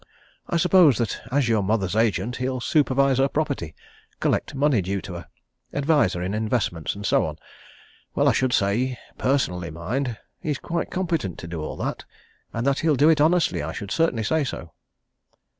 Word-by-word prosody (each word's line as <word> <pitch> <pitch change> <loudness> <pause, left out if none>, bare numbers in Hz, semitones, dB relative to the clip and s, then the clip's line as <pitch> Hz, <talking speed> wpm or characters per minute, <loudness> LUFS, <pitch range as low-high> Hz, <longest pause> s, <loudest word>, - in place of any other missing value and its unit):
I 170 - +1
suppose 175 - +5
that 115 - -2
as 140 -2 +2
your 110 -2 +2
mother's 100 -2 0
agent, 110 +1 +1
he'll 130 0 -2
supervise 135 0 +2
her 135 - +4
property, 140 - -2 0.4
collect - - 0
money 140 -5 +3
due 95 +2 -2
to 95 - -8
her, 85 - -8 0.5
advise 145 - +2
her 90 - -3
in 95 +2 -2
investments, 105 - -1
and 100 0 -7
so - - +3
on. - - -4 0.8
Well, - - +3
I - - +6
should 130 -1 +1
say 120 +5 +1 0.2
personally, 90 -11 0
mind 110 - -3 0.2
he's 150 -3 -2
quite 170 +4 -3
competent 165 - -2
to 85 - -8
do 85 -1 -5
all 75 - -5
that, - - -3 0.5
and 115 +2 -3
that 140 0 +2
he'll 160 -2 +2
do 145 +4 +5
it 155 -2 +4
honestly, 165 - +3
I 75 +2 -4
should 100 0 -6
certainly 150 -8 +1
say 160 +7 +1
so." 85 -10 -6
125 Hz, 180 wpm, -24 LUFS, 100-145 Hz, 0.8 s, I